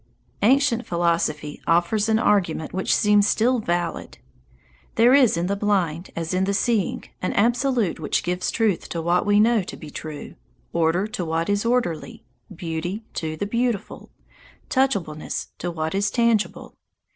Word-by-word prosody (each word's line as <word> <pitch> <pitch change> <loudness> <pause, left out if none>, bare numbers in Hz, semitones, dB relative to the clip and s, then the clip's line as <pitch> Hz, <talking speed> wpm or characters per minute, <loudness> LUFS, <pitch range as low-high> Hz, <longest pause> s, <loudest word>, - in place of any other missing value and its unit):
Ancient 250 +1 +3
philosophy 170 -3 -1
offers 175 +6 +2
an 220 - +4
argument 180 -8 +1
which 190 +1 -1
seems 205 0 +4
still 245 +4 +2
valid. 175 -4 -3 0.8
There 235 +3 +5
is 260 -10 +5
in 170 - 0
the 200 +2 0
blind 190 -5 0
as 165 +1 -3
in 185 +1 +1
the 200 +1 0
seeing 220 -2 0 0.2
an 185 - -1
Absolute 240 -3 +1
which 155 - -1
gives 180 +1 -1
truth 215 -6 0
to 170 - -3
what 175 +4 +1
we 205 0 +4
know 225 0 +4
to 180 - -8
be 155 -2 -10
true, 155 -1 -7 0.4
order 170 +3 +2
to 185 - -4
what 165 +2 -1
is 205 +2 0
orderly, 235 -2 -1 0.3
beauty 175 +4 -4
to 155 -1 -4
the 205 - -2
beautiful, 235 0 -2 0.6
touchableness 200 - -1
to 175 - -3
what 160 -1 -3
is 200 +1 +1
tangible. 235 -3 0
195 Hz, 155 wpm, -23 LUFS, 170-225 Hz, 0.8 s, There